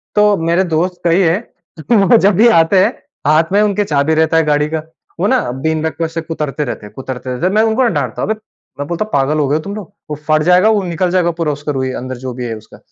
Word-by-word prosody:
तो 210 Hz, 0 st, +4 dB
मेरे 170 Hz, +2 st, +1 dB
दोस्त 180 Hz, +3 st, -1 dB
कई 170 Hz, +1 st, +3 dB
है 170 Hz, -1 st, +3 dB, 0.5 s
वो 225 Hz, +1 st, +5 dB
जब 200 Hz, -2 st, +3 dB
भी 220 Hz, +6 st, +5 dB
आते 165 Hz, +4 st, +3 dB
हैं -, -, +1 dB, 0.3 s
हाथ 155 Hz, +3 st, +3 dB
में 200 Hz, +2 st, +3 dB
उनके 210 Hz, -1 st, +1 dB
चाबी 150 Hz, -3 st, +1 dB
रहता 160 Hz, +1 st, +2 dB
है 165 Hz, -, +4 dB
गाड़ी 150 Hz, 0 st, +1 dB
का। 160 Hz, 0 st, -3 dB, 0.4 s
वो 190 Hz, -, +1 dB
ना 260 Hz, +3 st, +3 dB
बीन 155 Hz, +5 st, -2 dB
बैग 160 Hz, 0 st, -2 dB
को 165 Hz, -, -1 dB
ऐसे 165 Hz, +1 st, -4 dB
कुतरते 150 Hz, -3 st, -3 dB
रहते 120 Hz, -, -6 dB
हैं 105 Hz, -, -13 dB
कुतरते 130 Hz, -1 st, -7 dB
रहते 125 Hz, +7 st, -2 dB
हैं। 185 Hz, -, +2 dB
मैं 215 Hz, -, +4 dB
उनको 225 Hz, +3 st, +2 dB
डाँटता -, -, -2 dB
हूँ, -, -, -2 dB
"अबे! 215 Hz, -, -3 dB, 0.4 s
मैं 145 Hz, -, -3 dB
बोलता 175 Hz, +6 st, -2 dB
हूँ 215 Hz, -, -17 dB
पागल 140 Hz, +2 st, +1 dB
हो 145 Hz, -, +1 dB
गए 145 Hz, -, +1 dB
हो 155 Hz, -, -1 dB
तुम 200 Hz, +5 st, -6 dB
लोग? 205 Hz, -2 st, -9 dB, 0.2 s
वोह 150 Hz, -, -4 dB
फट 155 Hz, 0 st, +3 dB
जाएगा, 180 Hz, +5 st, +4 dB
वो 210 Hz, -3 st, +2 dB
निकल 175 Hz, 0 st, -1 dB
जाएगा 175 Hz, -2 st, +2 dB
पूरा 155 Hz, -2 st, +1 dB
उसका 150 Hz, +1 st, -4 dB
रूई 130 Hz, -2 st, -2 dB
अंदर 130 Hz, +1 st, -5 dB
जो 130 Hz, -, -4 dB
भी 125 Hz, 0 st, -5 dB
है 115 Hz, -1 st, -4 dB
उसका।" 110 Hz, -, -15 dB
165 Hz, 270 wpm, -15 LUFS, 150-190 Hz, 0.5 s, वो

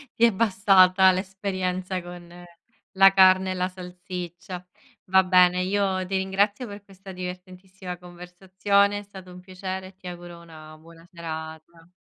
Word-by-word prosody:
Ti 230 Hz, -, -1 dB
è 230 Hz, -, +4 dB
bastata 190 Hz, -2 st, +4 dB
l'esperienza 185 Hz, -1 st, -3 dB
con 175 Hz, 0 st, -12 dB, 0.5 s
la 195 Hz, 0 st, +6 dB
carne 190 Hz, 0 st, +5 dB
e -, -, -1 dB
la 180 Hz, 0 st, -1 dB
salsiccia. 180 Hz, 0 st, -9 dB, 0.4 s
Va 190 Hz, 0 st, +4 dB
bene, 180 Hz, -1 st, +4 dB
io 190 Hz, -1 st, -1 dB
ti 195 Hz, +1 st, -4 dB
ringrazio 200 Hz, +5 st, 0 dB
per 205 Hz, 0 st, -10 dB
questa 195 Hz, -1 st, -13 dB
divertentissima 185 Hz, 0 st, -9 dB
conversazione, 190 Hz, +3 st, -1 dB
è 205 Hz, -, -10 dB
stato 190 Hz, -2 st, -13 dB
un 180 Hz, -, -12 dB
piacere, 185 Hz, 0 st, -7 dB
e 190 Hz, -, -17 dB
ti 185 Hz, -1 st, -13 dB
auguro 175 Hz, -1 st, -10 dB
una 155 Hz, -2 st, -14 dB
buona 165 Hz, +1 st, -18 dB
serata. 165 Hz, 0 st, -9 dB
185 Hz, 145 wpm, -24 LUFS, 180-190 Hz, 0.5 s, la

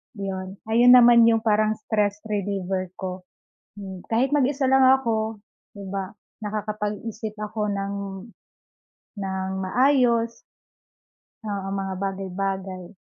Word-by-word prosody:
'yon. 190 Hz, -1 st, -5 dB, 0.2 s
Ayun 245 Hz, +2 st, +7 dB
naman 235 Hz, -1 st, +7 dB
'yong 225 Hz, -1 st, +3 dB
parang 215 Hz, 0 st, +2 dB
stress 210 Hz, -1 st, -1 dB
reliever 195 Hz, -3 st, -2 dB
ko. 185 Hz, -1 st, -6 dB, 0.5 s
Hmm, 190 Hz, -3 st, -9 dB
kahit 240 Hz, +4 st, +1 dB
mag-isa 280 Hz, -1 st, +1 dB
lang 265 Hz, 0 st, +6 dB
ako, 225 Hz, -5 st, +2 dB, 0.3 s
'di 200 Hz, -, -9 dB
ba, 195 Hz, 0 st, -4 dB, 0.3 s
nakakapag-isip 215 Hz, +1 st, -4 dB
ako 210 Hz, 0 st, -2 dB
ng 200 Hz, -1 st, -2 dB, 1.3 s
ng 190 Hz, -1 st, -3 dB
maayos. 235 Hz, 0 st, +2 dB, 1.1 s
Oo, 200 Hz, -2 st, -4 dB
mga 195 Hz, -1 st, -3 dB
bagay-bagay. 195 Hz, -1 st, -4 dB
210 Hz, 105 wpm, -24 LUFS, 195-230 Hz, 1.3 s, Ayun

